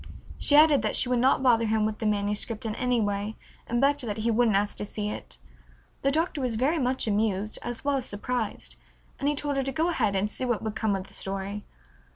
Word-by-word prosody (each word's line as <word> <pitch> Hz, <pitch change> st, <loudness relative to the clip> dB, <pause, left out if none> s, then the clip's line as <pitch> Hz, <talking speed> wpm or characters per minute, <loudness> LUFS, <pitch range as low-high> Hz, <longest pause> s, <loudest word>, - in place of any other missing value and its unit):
She 290 Hz, -, +4 dB
added 300 Hz, -3 st, +7 dB
that 215 Hz, -, -1 dB
she 250 Hz, -, +1 dB
would 250 Hz, -1 st, +2 dB
not 260 Hz, +1 st, +3 dB
bother 230 Hz, -3 st, +4 dB
him 215 Hz, 0 st, +2 dB
with 215 Hz, 0 st, -3 dB
the 220 Hz, -, -1 dB
manuscript 210 Hz, +2 st, -1 dB
in 220 Hz, -, -2 dB
any 250 Hz, +1 st, 0 dB
way 205 Hz, 0 st, -1 dB, 0.3 s
and 240 Hz, +1 st, 0 dB
begged 285 Hz, +2 st, +3 dB
that 205 Hz, 0 st, -3 dB
he 225 Hz, +2 st, 0 dB
wouldn't 225 Hz, -2 st, +3 dB
ask 205 Hz, +1 st, 0 dB
to -, -, -2 dB
see 210 Hz, 0 st, -4 dB
it. -, -, -8 dB, 0.6 s
The 275 Hz, -, +2 dB
Doctor 315 Hz, 0 st, 0 dB
was 250 Hz, -3 st, -1 dB
very 285 Hz, +8 st, +1 dB
much 255 Hz, 0 st, 0 dB
amused 210 Hz, -1 st, 0 dB
as 240 Hz, +2 st, -6 dB
well 285 Hz, -1 st, +2 dB
as 260 Hz, -, -1 dB
surprised, 220 Hz, +2 st, -4 dB, 0.4 s
and 285 Hz, -, +1 dB
he 295 Hz, -, 0 dB
told 285 Hz, 0 st, -2 dB
her 270 Hz, -, +1 dB
to 270 Hz, -, -2 dB
go 320 Hz, +5 st, 0 dB
ahead 215 Hz, -, +1 dB
and 195 Hz, +2 st, +1 dB
see 210 Hz, -, -5 dB
what 240 Hz, -4 st, -1 dB
would 220 Hz, -1 st, -3 dB
come 215 Hz, -2 st, 0 dB
of 190 Hz, -1 st, -4 dB
the -, -, -14 dB
story. 195 Hz, +2 st, -4 dB
225 Hz, 235 wpm, -27 LUFS, 210-265 Hz, 0.6 s, added